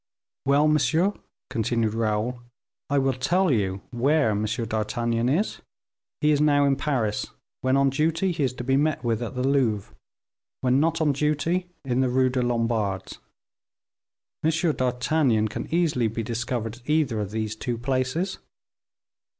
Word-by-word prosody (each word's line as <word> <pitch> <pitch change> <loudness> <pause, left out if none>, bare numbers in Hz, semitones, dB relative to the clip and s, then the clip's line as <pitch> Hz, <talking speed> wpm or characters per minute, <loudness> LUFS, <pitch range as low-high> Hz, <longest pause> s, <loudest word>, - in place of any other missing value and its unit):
"Well, 145 +2 +4
monsieur," 155 +6 +2 0.4
continued 115 -1 0
Raoul, 115 +2 -1 0.5
"I 145 - +2
will 135 -1 +2
tell 170 +8 +1
you 95 -5 0
where 135 +1 +2
M. 105 +1 0
d'Artagnan 115 +1 -1
is: 180 +11 0 0.6
he 150 0 +4
is 145 -1 +2
now 145 -1 +4
in 140 -1 +3
Paris; 130 -7 -1 0.3
when 130 +1 +2
on 140 0 +3
duty 165 +6 +1
he 165 -2 -3
is 130 - 0
to 125 - -6
be 135 +2 +2
met 150 -2 +1
with 115 -1 0
at 120 +2 -5
the 125 +1 0
Louvre, 110 - +1 0.7
when 130 +1 +3
not 165 +2 +1
on 150 -2 +3
duty, 155 +5 0 0.2
in 125 -1 0
the 130 -1 +2
Rue 130 +1 +3
des 130 0 0
Lombards. 115 -5 -1 1.2
M. 160 - +3 0.3
d'Artagnan 125 -2 +1
can 110 - -6
easily 160 -9 +2
be 115 +1 -3
discovered 115 0 -3
at 125 +3 -16
either 150 -8 +2
of 105 -2 -3
those 110 0 -3
two 120 +1 -3
places. 130 +9 -1
130 Hz, 155 wpm, -25 LUFS, 115-150 Hz, 1.2 s, Well